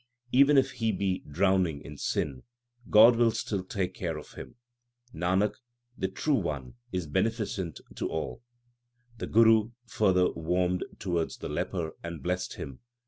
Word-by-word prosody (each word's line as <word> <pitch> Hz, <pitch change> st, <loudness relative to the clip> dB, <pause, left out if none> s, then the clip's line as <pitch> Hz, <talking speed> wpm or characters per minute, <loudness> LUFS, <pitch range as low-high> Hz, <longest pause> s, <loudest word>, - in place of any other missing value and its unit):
^Even 140 Hz, +2 st, +6 dB
if 135 Hz, 0 st, +4 dB
he 115 Hz, -3 st, 0 dB
be 95 Hz, -1 st, -1 dB
drowning 90 Hz, -1 st, +2 dB
in 75 Hz, -, -9 dB
sin, 70 Hz, -2 st, -2 dB, 0.5 s
God 115 Hz, +3 st, +8 dB
will 120 Hz, -1 st, +5 dB
still 100 Hz, -3 st, -2 dB
take 95 Hz, -1 st, -2 dB
care 85 Hz, -4 st, -3 dB
of 75 Hz, -, -10 dB
him. -, -, -10 dB, 0.6 s
^Nanak, 95 Hz, +5 st, +1 dB, 0.4 s
the 95 Hz, -, -1 dB
True 120 Hz, +10 st, -1 dB
One 75 Hz, -, -2 dB, 0.2 s
is 90 Hz, -2 st, -2 dB
beneficent 100 Hz, -, -1 dB, 0.2 s
to -, -, -2 dB
all. 65 Hz, -6 st, -3 dB
1 -, -, -29 dB, 0.8 s
The -, -, -3 dB
Guru 115 Hz, 0 st, +5 dB
further 95 Hz, -6 st, +2 dB
warmed 90 Hz, +2 st, 0 dB
towards 85 Hz, -3 st, -2 dB
the -, -, -6 dB
leper 85 Hz, -4 st, -2 dB
and 85 Hz, -4 st, -7 dB
blessed 90 Hz, +1 st, -2 dB
him. 65 Hz, -2 st, -7 dB
90 Hz, 150 wpm, -29 LUFS, 80-110 Hz, 0.8 s, God